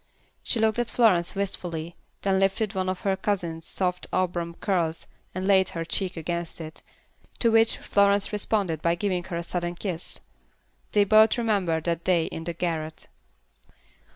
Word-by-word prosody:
She -, -, -1 dB
looked 220 Hz, +1 st, +2 dB
at 240 Hz, -, 0 dB
Florence 185 Hz, -8 st, +3 dB
wistfully, 175 Hz, -4 st, -3 dB, 0.3 s
then 195 Hz, -1 st, +2 dB
lifted 195 Hz, +2 st, +1 dB
one 185 Hz, -1 st, -1 dB
of 185 Hz, -, -3 dB
her 195 Hz, -1 st, +1 dB
cousin's 170 Hz, -5 st, -2 dB
soft 180 Hz, -1 st, -2 dB
auburn 175 Hz, -2 st, -1 dB
curls, 170 Hz, -5 st, -1 dB, 0.3 s
and 185 Hz, 0 st, -2 dB
laid 190 Hz, -2 st, +4 dB
her 165 Hz, -1 st, -4 dB
cheek 185 Hz, +2 st, -2 dB
against 170 Hz, +1 st, -3 dB
it; 160 Hz, -1 st, -8 dB, 0.6 s
to 230 Hz, -, +3 dB
which 225 Hz, 0 st, +4 dB
Florence 200 Hz, 0 st, +2 dB
responded 200 Hz, -6 st, 0 dB
by 170 Hz, 0 st, +2 dB
giving 180 Hz, -1 st, -1 dB
her 175 Hz, -3 st, -4 dB
a 170 Hz, -, -3 dB
sudden 175 Hz, 0 st, -3 dB
kiss. 175 Hz, -2 st, -4 dB, 0.7 s
They 205 Hz, -, +5 dB
both 215 Hz, +3 st, +5 dB
remembered 195 Hz, -9 st, +1 dB
that 170 Hz, -1 st, -1 dB
day 175 Hz, -3 st, +2 dB
in 165 Hz, -, -6 dB
the 170 Hz, -, -2 dB
garret. 160 Hz, -2 st, -4 dB
185 Hz, 160 wpm, -26 LUFS, 170-200 Hz, 0.7 s, They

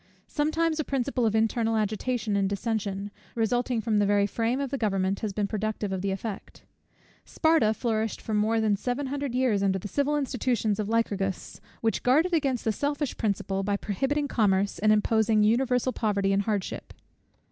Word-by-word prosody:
Sometimes 315 Hz, +2 st, 0 dB
a -, -, +1 dB
principle 260 Hz, -3 st, 0 dB
of 220 Hz, -, 0 dB
internal 225 Hz, 0 st, +1 dB
agitation 215 Hz, +1 st, -1 dB
and 195 Hz, -1 st, +1 dB
dissension, 200 Hz, -1 st, -2 dB, 0.2 s
resulting 240 Hz, +1 st, 0 dB
from 215 Hz, -1 st, +1 dB
the 205 Hz, -, +3 dB
very 205 Hz, 0 st, +3 dB
frame 230 Hz, +5 st, -1 dB
of 275 Hz, -2 st, -3 dB
the 275 Hz, -, -1 dB
government, 195 Hz, -2 st, 0 dB
has 215 Hz, -, -2 dB
been 205 Hz, +1 st, -1 dB
productive 215 Hz, 0 st, -2 dB
of 190 Hz, -1 st, -2 dB
the 200 Hz, -, -1 dB
effect. 195 Hz, +1 st, -6 dB, 0.6 s
Sparta 315 Hz, -9 st, +2 dB
flourished 220 Hz, -2 st, -1 dB
for 220 Hz, -, -5 dB
more 215 Hz, +2 st, +2 dB
than 215 Hz, -2 st, +2 dB
seven 245 Hz, +7 st, -2 dB
hundred 275 Hz, -1 st, -3 dB
years 250 Hz, -6 st, +2 dB
under 195 Hz, -1 st, +2 dB
the 190 Hz, -, -6 dB
civil 285 Hz, +6 st, 0 dB
institutions 250 Hz, -6 st, 0 dB
of 210 Hz, -1 st, -2 dB
Lycurgus; 200 Hz, -4 st, -1 dB, 0.2 s
which 225 Hz, -1 st, 0 dB
guarded 310 Hz, +8 st, +3 dB
against 275 Hz, -7 st, 0 dB
the 220 Hz, -, +2 dB
selfish 285 Hz, +4 st, -2 dB
principle, 200 Hz, -3 st, -1 dB
by 200 Hz, +1 st, 0 dB
prohibiting 270 Hz, +9 st, -1 dB
commerce, 200 Hz, -5 st, +1 dB
and 215 Hz, +1 st, +4 dB
imposing 215 Hz, 0 st, +3 dB
universal 250 Hz, +3 st, +2 dB
poverty 200 Hz, -3 st, 0 dB
and 195 Hz, -, +2 dB
hardship. 205 Hz, -2 st, -3 dB
220 Hz, 175 wpm, -27 LUFS, 205-255 Hz, 0.6 s, and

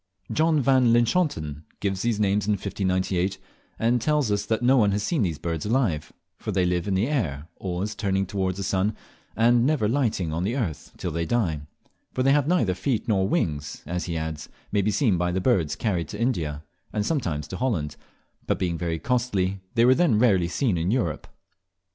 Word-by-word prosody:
John 155 Hz, -1 st, +3 dB
van 130 Hz, -3 st, +4 dB
Linschoten 115 Hz, -, +1 dB, 0.2 s
gives 95 Hz, -2 st, -1 dB
these 115 Hz, -3 st, 0 dB
names 100 Hz, -1 st, +1 dB
in 105 Hz, -, +3 dB
1598, 95 Hz, -1 st, -1 dB, 0.4 s
and 120 Hz, +1 st, +2 dB
tells 150 Hz, -4 st, +1 dB
us 100 Hz, 0 st, 0 dB
that 110 Hz, +1 st, 0 dB
no 130 Hz, +2 st, +5 dB
one 105 Hz, -6 st, +4 dB
has 100 Hz, 0 st, -1 dB
seen 155 Hz, +4 st, 0 dB
these 85 Hz, -7 st, 0 dB
birds 80 Hz, 0 st, -3 dB
alive, 105 Hz, -, 0 dB, 0.3 s
for -, -, -4 dB
they 90 Hz, -, +2 dB
live 90 Hz, +1 st, 0 dB
in 100 Hz, -, +1 dB
the 95 Hz, +4 st, +2 dB
air, 80 Hz, -, -2 dB
always 95 Hz, +3 st, -3 dB
turning 95 Hz, -1 st, 0 dB
towards 95 Hz, -1 st, -2 dB
the 100 Hz, -, -3 dB
sun, 100 Hz, +2 st, 0 dB, 0.4 s
and 120 Hz, +1 st, +4 dB
never 135 Hz, -5 st, +2 dB
lighting 110 Hz, -, 0 dB
on 85 Hz, +2 st, -1 dB
the 110 Hz, +6 st, -1 dB
earth 95 Hz, -, -3 dB
till 90 Hz, -, -3 dB
they 85 Hz, +1 st, -2 dB
die; 90 Hz, -11 st, 0 dB, 0.5 s
for 130 Hz, -, +1 dB
they 135 Hz, -, +4 dB
have 145 Hz, 0 st, +3 dB
neither 160 Hz, -, +2 dB
feet 110 Hz, +6 st, -1 dB
nor 95 Hz, -4 st, +2 dB
wings, 75 Hz, -, -1 dB
as, 90 Hz, +3 st, -3 dB
he 85 Hz, -2 st, -3 dB
adds, 80 Hz, -1 st, -5 dB, 0.2 s
may 100 Hz, -, +2 dB
be 100 Hz, -, +1 dB
seen 105 Hz, -, +2 dB
by 90 Hz, 0 st, +1 dB
the 95 Hz, -, 0 dB
birds 90 Hz, -, +1 dB
carried 90 Hz, -8 st, -1 dB
to 105 Hz, -, -7 dB
India, 80 Hz, -, -1 dB, 0.3 s
and 105 Hz, -1 st, -1 dB
sometimes 85 Hz, -, -1 dB
to 95 Hz, -, -5 dB
Holland, 100 Hz, -, -1 dB, 0.5 s
but -, -, +1 dB
being 85 Hz, -3 st, -1 dB
very 85 Hz, -2 st, -1 dB
costly 100 Hz, -4 st, 0 dB, 0.2 s
they 115 Hz, 0 st, +5 dB
were 125 Hz, -, +7 dB
then 150 Hz, -7 st, +3 dB
rarely 100 Hz, -7 st, +4 dB
seen 95 Hz, 0 st, 0 dB
in 85 Hz, +3 st, 0 dB
Europe. 105 Hz, -9 st, -1 dB
100 Hz, 200 wpm, -25 LUFS, 90-120 Hz, 0.5 s, were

